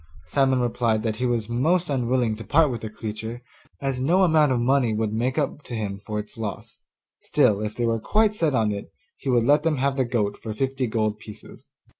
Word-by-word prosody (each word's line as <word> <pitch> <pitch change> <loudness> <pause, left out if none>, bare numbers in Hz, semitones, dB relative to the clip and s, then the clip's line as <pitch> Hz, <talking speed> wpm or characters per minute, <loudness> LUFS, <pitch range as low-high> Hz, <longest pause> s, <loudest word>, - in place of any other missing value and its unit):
Simon 130 +8 +2
replied 115 -2 0
that 110 -2 -1
he 125 +2 0
was 115 -3 -1
most 160 +10 +1
unwilling 125 -4 0
to 115 - -8
part 145 +6 +3
with 120 - -5
the 110 - -5
creature, 110 +2 -6 0.4
as 135 -2 -2
no 175 +8 +3
amount 155 -5 +4
of 125 - +1
money 120 -2 +2
would 110 -1 -1
make 125 +5 -1
up 145 0 -1
to 125 - -7
him 100 -3 -3
for 105 +1 -5
its 105 +2 -7
loss; 105 -3 -6 0.4
still, 105 -1 +2
if 105 0 -4
they 120 - -1
were 115 -1 +1
quite 215 - +2
set 160 -9 0
on 110 -3 +2
it, 100 -1 -6 0.2
he 140 - -5
would 120 -2 +3
let 145 +5 +4
them 160 -2 0
have 135 +1 0
the 130 - +3
goat 105 -4 -1
for 110 -2 -6
fifty 135 0 -1
gold 110 -2 -1
pieces. 105 -1 -12
120 Hz, 220 wpm, -24 LUFS, 110-135 Hz, 0.4 s, amount